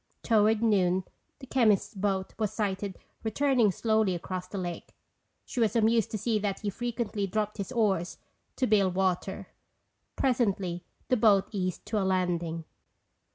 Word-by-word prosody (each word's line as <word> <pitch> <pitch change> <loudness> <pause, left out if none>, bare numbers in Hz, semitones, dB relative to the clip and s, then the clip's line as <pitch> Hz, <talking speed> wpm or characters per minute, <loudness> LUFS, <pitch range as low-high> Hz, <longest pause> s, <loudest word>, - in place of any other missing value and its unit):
Toward 220 0 +3
noon 190 -4 +3 0.3
the 275 - -11
chemist's 230 -7 +2
boat 195 -1 -1
was 215 -2 0
sighted 200 -3 -2 0.3
returning 240 -1 +2
slowly 220 -2 +1
across 180 +1 -5
the 195 - -6
lake. 175 -2 -5 0.5
She 255 - -5
was 220 -2 +2
amused 225 -1 +3
to 215 - -3
see 220 +1 0
that 200 -2 -2
he 205 - -2
frequently 230 -2 -2
dropped 210 +2 -2
his 200 -3 -4
oars 195 -6 0 0.4
to 260 - +1
bail 205 -4 +3
water. 190 +1 -1 0.7
Presently, 200 -9 0 0.3
the 255 - +3
boat 210 -4 +4
eased 185 -3 -3
to 215 - -1
a - - 0
landing. 175 -3 0
205 Hz, 150 wpm, -29 LUFS, 185-220 Hz, 0.7 s, boat